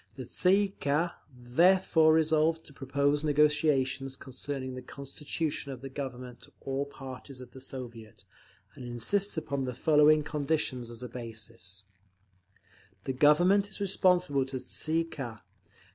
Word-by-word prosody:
_ - - -30
The 130 -1 -7
Tsay 180 +9 +3
ee 195 -1 -4
kah 150 +5 +1 0.2
therefore 160 +6 +4
resolves 160 0 +3
to 150 - -15
propose 140 +2 0
negotiations 145 -3 +2
concerning 130 0 -6
the 130 - -6
constitution 140 +3 -4
of 130 -2 -8
the 135 - -7
Government 125 -3 -6
to - - -13
all 135 +1 -2
parties 135 -1 -9
of 125 -1 -11
the 130 - -12
Soviet, 120 -5 -9 0.5
and - - -10
insists 145 - 0
upon 140 -4 -2
the 125 -1 -4
following 150 +2 +5
conditions 145 -5 -1
as 120 +1 -6
a - - -4
basis: 115 -4 -7 1.2
The 130 - -2
Government 175 +9 +4
is - - -6
responsible 180 -8 +2
to 135 0 -4
the - - -8
_Tsay 160 +1 -1
ee - - 0
kah. 130 -9 -7
140 Hz, 150 wpm, -30 LUFS, 125-155 Hz, 1.2 s, following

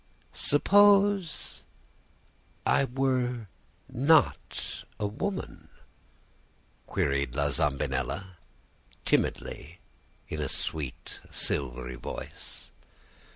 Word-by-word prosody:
"'Suppose 200 +2 +4 1.0
I 140 - +4
were 125 -4 0 0.4
not 145 +4 +2 0.2
a 105 - 0
woman?' 185 - -4 1.2
queried 70 -2 0
La 70 0 +1
Zambinella, 70 +6 -1 0.7
timidly, 85 +5 -1 0.5
in 80 - -4
a 75 - -2
sweet, 75 -4 -3
silvery 65 -2 -1
voice. 65 - -8
95 Hz, 65 wpm, -29 LUFS, -, 1.2 s, Suppose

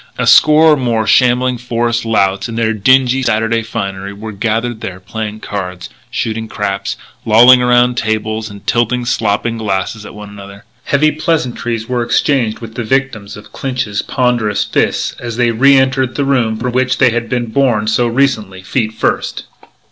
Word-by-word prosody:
A - - -1
score 155 +1 +6
or - - +1
more 115 -4 0
shambling 125 +1 +2
forest 120 -1 -1
louts 100 -1 0
in 115 - -6
their 115 -1 0
dingy 130 +4 +3
Saturday 115 -1 0
finery 100 -3 -5
were 110 +2 -8
gathered 115 +2 -2
there 95 -1 -6
playing 110 +3 -6
cards, 90 -3 -6 0.2
shooting 110 0 -3
craps, 100 -2 -3 0.3
lolling 120 +3 +6
around 125 0 +3
tables 110 0 -2
and 100 -1 -12
tilting 120 +1 0
slopping 115 0 -1
glasses 105 +1 -3
at 105 - -11
one 105 0 -9
another. 100 0 -12 0.2
Heavy 155 +2 +2
pleasantries 125 -7 -2
were 125 -1 -1
exchanged 120 -2 0
with 115 -1 -9
the 120 - -4
victims 115 -5 -2
of 105 - -14
Clinch's 125 -6 -3
ponderous 120 -5 0
fists - - -1
as 120 -1 -6
they 120 -1 +2
re 135 +4 +4
entered 130 -1 +1
the 140 - -1
room 120 -5 +1
from 125 +2 -3
which 130 +1 0
they 130 -3 +4
had 115 0 -3
been 120 -2 -2
borne 120 -5 +1
so 120 +2 +1
recently, 115 -7 -1
feet 110 +3 -2
first. - - -2
115 Hz, 170 wpm, -14 LUFS, 110-125 Hz, 0.3 s, score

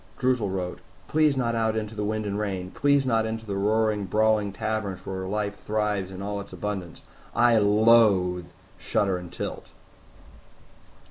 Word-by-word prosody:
Droozle 125 -5 +1
wrote, 90 -1 -3 0.3
"Please 155 -2 +3
not 120 -2 0
out 110 -1 +1
into 110 0 -3
the 105 -1 -3
wind 110 +1 -2
and 100 - -2
the 100 - -2
rain. 95 -3 -3
Please 140 -1 +2
not 115 -3 +2
into 110 0 -4
the 100 -2 -3
roaring, 105 +1 +1
brawling 105 +1 +2
taverns 100 -3 -3
where 95 -1 -4
life 105 0 -2
thrives 105 -3 -1
in 95 +1 -7
all 100 0 -3
its 100 - -12
abundance. 95 -5 -5 0.3
I 120 -2 +5
loathe 100 -4 +4 0.3
shudder 95 -3 0
and 90 -1 -10
tilt." - - -6
105 Hz, 160 wpm, -26 LUFS, 95-110 Hz, 0.3 s, I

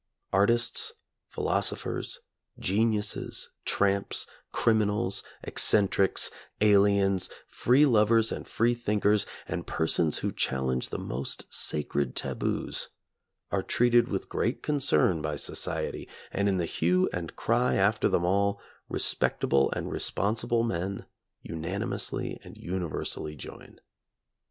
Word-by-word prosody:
Artists, 115 +5 +3 0.3
philosophers, - - -1 0.4
geniuses, 105 +1 -1
tramps, 100 0 +1 0.3
criminals, 105 -3 +1 0.2
eccentrics, 100 -2 +3 0.3
aliens, 100 -2 +3 0.2
free 130 +5 +3
lovers 115 -2 +4
and - - -5
free 120 +2 +2
thinkers, 105 -3 +1 0.2
and - - -4
persons 80 -1 +2
who - - -2
challenge 65 -1 -1
the - - -4
most 65 +3 -4
sacred 70 -3 -1
taboos, - - -1 0.6
are - - +1
treated 120 0 +3
with 95 -5 -3
great 120 +5 -2
concern 95 - +2
by 75 0 -2
society, - - -3 0.2
and 100 +1 +1
in 95 - +1
the 85 - 0
hue 90 +3 +1
and 85 -2 -5
cry 120 +2 +1
after 100 +3 +2
them 85 - +1
all, 100 +2 +1 0.3
respectable 70 0 +2
and - - -4
responsible 115 +3 0
men 95 -3 -3 0.4
unanimously 85 +5 -3
and - - -12
universally 85 -3 -4
join. 70 - -11
100 Hz, 110 wpm, -28 LUFS, 85-110 Hz, 0.6 s, lovers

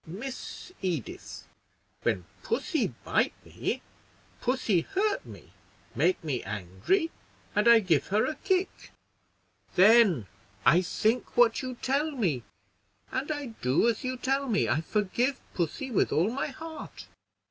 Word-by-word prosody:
"Miss 245 - -7
Edith, 170 - -4 0.6
when 90 -2 0 0.2
pussy - - 0 0.2
bite - - +1
me, - - -3 0.6
pussy 235 -8 +2
hurt 400 - 0
me, - - -13 0.4
make 370 - +2
me 140 -6 -1
angry, 100 - -1 0.4
and 210 +2 +3
I 235 -1 +8
give 165 -8 +2
her 210 +3 +2
a 310 - -1
kick; 380 0 -1 0.9
then 195 - +6 0.4
I 170 +3 +6
think 220 +6 0
what 240 -2 +5
you 255 -1 -5
tell 280 +4 +1
me, 190 - 0 0.7
and 260 +3 -2
I 290 -2 -3 0.2
do 130 - +3
as 235 +2 0
you 255 0 -2
tell 270 +2 0
me. 205 -4 +2
I 155 - +1
forgive 215 - 0
pussy 185 - -2
with 215 - +2
all 175 +8 +2
my 270 - -2
heart." 320 +3 -8
225 Hz, 135 wpm, -29 LUFS, 170-270 Hz, 0.9 s, I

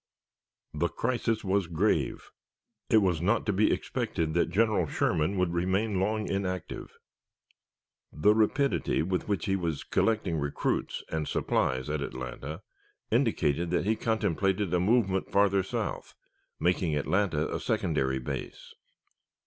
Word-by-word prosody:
The 80 +3 +1
crisis 115 +1 -1
was 95 -2 +1
grave. 85 +6 0 0.6
It 110 -2 +5
was 90 -4 +1
not 105 +6 +1
to 105 - +1
be 105 +3 +3
expected 80 -1 -2
that 85 - +2
General 105 -5 +2
Sherman 80 +6 0
would 90 -2 +1
remain 95 +4 0
long 105 +2 0
inactive. 95 -3 -4 1.1
The 75 +9 +4
rapidity 110 - +1
with 90 +2 -2
which 100 -5 -1
he 95 - +1
was 85 -6 -2
collecting 105 -8 +1
recruits 70 0 -2
and 80 -1 -2
supplies 65 +1 0
at 75 0 -2
Atlanta 65 +7 -6 0.5
indicated 80 +4 +1
that 90 - 0
he 110 +2 +2
contemplated 100 -4 0
a 90 - +3
movement 95 -1 +1
farther 100 -1 +4
south, 95 - -4 0.4
making 85 -3 +1
Atlanta 80 +1 0
a - - -1
secondary 65 -4 0
base. 65 - -6
90 Hz, 130 wpm, -29 LUFS, 80-105 Hz, 1.1 s, It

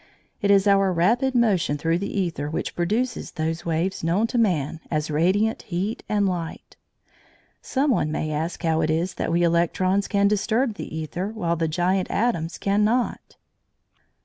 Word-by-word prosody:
It 200 - +1
is 200 0 +5
our 195 -1 +4
rapid 235 +10 +2
motion 200 -11 +2
through 165 +3 0
the 200 - -4
æther 165 -6 -2
which - - -3
produces 225 +8 -1
those 160 +1 -3
waves 170 +3 -1
known 175 +7 +2
to 245 - +2
man 165 -8 +1
as 155 -1 -1
radiant 190 +9 +1
heat 190 +4 -3
and 205 -1 +2
light. 175 -3 -5 0.9
Some 275 +2 0
one 155 -10 +1
may 155 0 -2
ask 160 +4 -3
how 160 -1 +2
it 155 - 0
is 170 +3 0
that - - -3
we 170 +1 +2
electrons 180 +3 +1
can 200 -1 +2
disturb 220 +4 +1
the 205 - -7
æther 160 +5 -4
while 175 -6 -1
the 165 0 0
giant 180 +4 0
atoms 195 -7 -1
cannot. 210 +5 0
185 Hz, 165 wpm, -24 LUFS, 165-210 Hz, 0.9 s, is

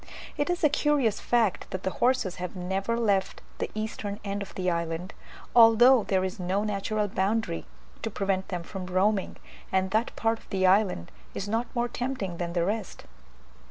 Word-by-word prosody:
It 290 +1 -1
is 355 -1 -1
a - - +8
curious 290 -7 +2
fact, 230 -6 +1
that 185 - -5
the 190 - 0
horses 245 -7 +2
have 180 0 -5
never 190 +5 -1
left 200 -4 0 0.2
the - - -2
eastern 215 -1 -4
end 200 0 -2
of 200 - -7
the 185 -1 -2
island, 170 +2 -2 0.4
although 235 +1 +7
there 190 -1 +1
is 190 +1 -4
no 185 +3 0
natural 210 0 -1
boundary 195 - -1 0.3
to - - -2
prevent 195 -2 -1
them 180 -2 -4
from 185 +1 -7
roaming, 190 +2 +1 0.3
and 190 0 +1
that 220 +4 0
part 225 0 0
of - - -22
the 190 -1 +1
island 185 - +3 0.2
is 200 - -3
not 225 +3 0
more 240 0 +1
tempting 240 -8 -3
than 170 -1 -3
the 170 -1 +1
rest. 210 +1 -3
200 Hz, 180 wpm, -27 LUFS, 185-225 Hz, 0.4 s, a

